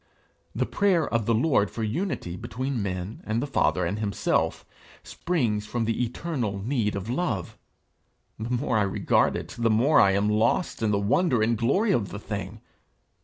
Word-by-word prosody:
The - - +1
prayer 190 -5 +2
of 115 -3 -1
the 115 - +3
Lord 115 -5 +2
for 115 - -5
unity 110 - -2
between 130 +5 -3
men 95 +1 -4
and 110 +2 -1
the 130 - -1
Father 90 -9 +1
and 100 +5 -2
himself, 105 -2 0 0.4
springs 115 -12 -1
from 120 0 -1
the 115 +2 0
eternal 120 -4 -3
need 105 0 -1
of 100 +1 -4
love. 120 - -2 0.8
The 110 +2 -4
more 125 -2 0
I - - +2
regard 100 -2 +2
it, - - -5
the 115 -1 +2
more 120 +8 +4
I 95 -1 +5
am 100 +1 +1
lost 110 +11 +1
in 110 - +1
the 105 - +2
wonder 120 - +2
and 115 +1 +2
glory 165 - +2
of 110 - +1
the 100 - -6
thing. 100 -2 -6
115 Hz, 175 wpm, -26 LUFS, 100-130 Hz, 0.8 s, I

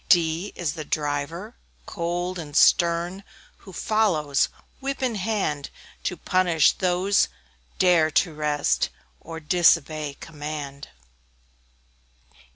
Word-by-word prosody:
D 170 +2 +3
D - - -18
is 165 -4 -1
the 160 -2 -6
Driver, 150 +8 -3 0.3
cold 175 +1 -3
and 145 -3 -8
stern, 175 +3 +3 0.3
Who 195 - -14
follows, 175 -9 +1 0.3
whip 275 0 -3
in 250 -2 +1
hand, 190 -9 -2 0.4
To - - -1
punish 175 -5 +3
those 185 +2 +2
who - - -18 0.5
dare 175 -4 +4
to 160 +2 +1
rest, 145 - 0 0.3
Or 165 0 -8
disobey 155 -3 +2
command. 150 -3 -7
170 Hz, 110 wpm, -24 LUFS, 150-185 Hz, 0.5 s, dare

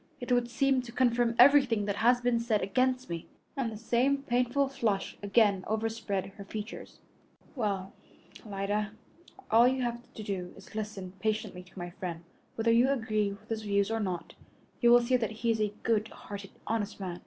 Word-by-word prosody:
It 245 0 -5
would 245 -1 +2
seem 265 +2 +2
to 245 -1 -10
confirm 240 -1 +2
everything 250 -5 +6
that 200 -1 -2
has 245 +2 +4
been 245 -1 +2
said 230 -3 +1
against 255 +5 +1
me," 170 -1 -5 0.3
and 260 -5 -1
the 215 - -7
same 255 +5 +1
painful 250 +2 +1
flush 230 -7 -1
again 205 -2 +3
overspread 220 -2 -1
her 200 - -7
features. 210 +2 -7 0.6
"Well, 200 -6 -2 0.5
Alida, 205 +1 -2 0.6
all 230 +2 +7
that 255 +1 +4
you 260 - -2
have 240 0 -4
to 215 - -6
do 185 -3 -4
is 195 - -13
to - - -10
listen 195 -4 -6
patiently 215 -3 -2
to 180 +1 -19
my 175 -1 -5
friend. 175 -3 -6 0.3
Whether 230 0 +2
you 240 +3 +5
agree 215 -6 0
with 200 +2 -12
his 225 -1 -2
views 200 0 +1
or 225 - 0
not, 185 -5 -3 0.5
you 240 - +5
will 240 0 +8
see 250 +2 +2
that 225 -3 -1 0.2
he 230 - +4
is 220 -1 0
a 210 -1 +1
good 220 -1 +2
hearted, 200 -2 -9 0.2
honest 215 -2 -2
man. 180 -3 -5
220 Hz, 190 wpm, -30 LUFS, 200-240 Hz, 0.6 s, will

